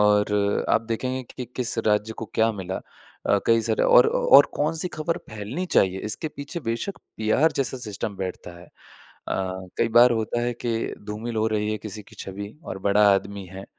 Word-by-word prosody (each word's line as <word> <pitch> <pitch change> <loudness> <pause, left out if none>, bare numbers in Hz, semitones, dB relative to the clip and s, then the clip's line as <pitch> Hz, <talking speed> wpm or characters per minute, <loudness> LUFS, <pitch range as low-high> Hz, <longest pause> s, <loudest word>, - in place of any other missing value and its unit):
और 105 -1 +2
आप - - +4
देखेंगे 130 +3 -2
कि 125 - -4
किस 120 -2 -2
राज्य 105 +1 +2
को 115 - -3
क्या 115 0 +3
मिला? 95 -2 -5 0.5
अ, - - +4
कई 115 0 +5
सारे 110 -1 +1
और 125 - +7
और 140 +1 +6
कौन-सी 160 +4 0
खबर 160 +2 -1
फैलनी 110 - -4
चाहिए, 95 - +2
इसके 110 +9 -3
पीछे 145 +4 -7
बेशक 115 - -3 0.2
पीआर 110 +9 +3
जैसा 135 -1 -1
सिस्टम 105 -3 -4
बैठता 95 -2 -5
है। - - -12
अ, - - -24 1.1
कई 115 - +3
बार 125 +1 +8
होता 110 +1 -1
है 120 0 0
कि 115 -1 -1
धूमिल 110 +2 -4
हो 110 0 +2
रही 105 0 -1
है 110 - -3
किसी 105 0 -8
की - - -18
छवि 100 +2 -7
और 95 - -5
बड़ा 105 +1 +5
आदमी 100 0 -3
है, 95 +1 -8
110 Hz, 185 wpm, -24 LUFS, 105-125 Hz, 1.1 s, बार